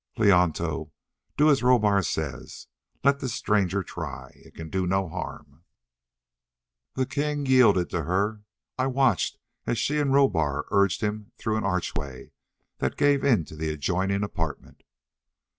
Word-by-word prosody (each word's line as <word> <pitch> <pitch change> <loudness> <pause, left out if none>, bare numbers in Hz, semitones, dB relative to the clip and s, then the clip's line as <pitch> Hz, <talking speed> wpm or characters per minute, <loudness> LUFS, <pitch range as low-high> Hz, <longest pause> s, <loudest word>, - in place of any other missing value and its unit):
"Leonto, 90 -7 +2 0.5
do 150 - +5
as 140 - +2
Rohbar 110 -5 +4
says. 85 - -4 0.4
Let 140 0 +3
this 130 -5 -3
stranger 100 -2 +1
try. 65 -5 -7
It - - -20
can 80 -1 -8
do 95 -1 -1
no 95 +1 +1
harm." 70 -1 -8 1.3
The 130 - +1
king 145 +1 -2
yielded 125 -9 +4
to 85 -4 -2
her; 100 +5 0 0.4
I 130 - +2
watched 130 -7 +1 0.3
as 120 - 0
she 150 +7 0
and 140 -2 +1
Rohbar 80 - +2
urged 100 -1 +2
him 105 -1 -3
through 110 -1 -1
an 110 - -2
archway 80 -8 -3 0.5
that - - -2
gave 145 -1 +3
into 100 - +1
the 80 0 -3
adjoining 95 +6 -1
apartment. 80 -7 -5
100 Hz, 140 wpm, -26 LUFS, 85-130 Hz, 1.3 s, do